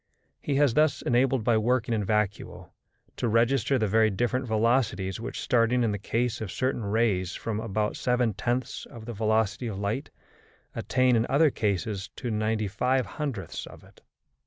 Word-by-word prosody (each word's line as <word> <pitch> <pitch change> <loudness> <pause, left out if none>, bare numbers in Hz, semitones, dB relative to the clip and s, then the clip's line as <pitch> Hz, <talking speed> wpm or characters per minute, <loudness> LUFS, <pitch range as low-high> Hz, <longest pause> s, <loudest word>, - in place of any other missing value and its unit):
He 145 - -1
has 140 -3 +3
thus 150 +1 +2
been - - -1
enabled 130 -1 +2
by 115 -1 +3
working 120 +1 +1
in 110 -2 0
vacuo 105 0 -2 0.5
to 120 - -1
register 120 +3 +2
the 110 - +1
very 110 +2 +3
different 120 +5 -1
velocities 110 -4 +1
which, 125 +3 -5
starting 120 +1 +2
in 115 - +1
the 100 - -3
case 115 +4 -1
of 105 -5 -4
certain 130 -3 -1
rays 100 -4 0
from 110 -2 -3
about 105 -1 -1
seven 125 -3 +1
tenths 120 +5 -3
of 115 -2 -11
the 120 - -5
velocity 110 +2 0
of 105 -4 -4
light, 105 +8 -2 0.6
attain 130 -1 +2
in 115 +1 +1
other 145 +2 +4
cases 100 -1 -2
to 125 -3 -4
ninety 110 0 0
five 125 +6 +1
hundredths 130 - -5
of - - -13
it. - - -20
115 Hz, 175 wpm, -27 LUFS, 105-125 Hz, 0.6 s, other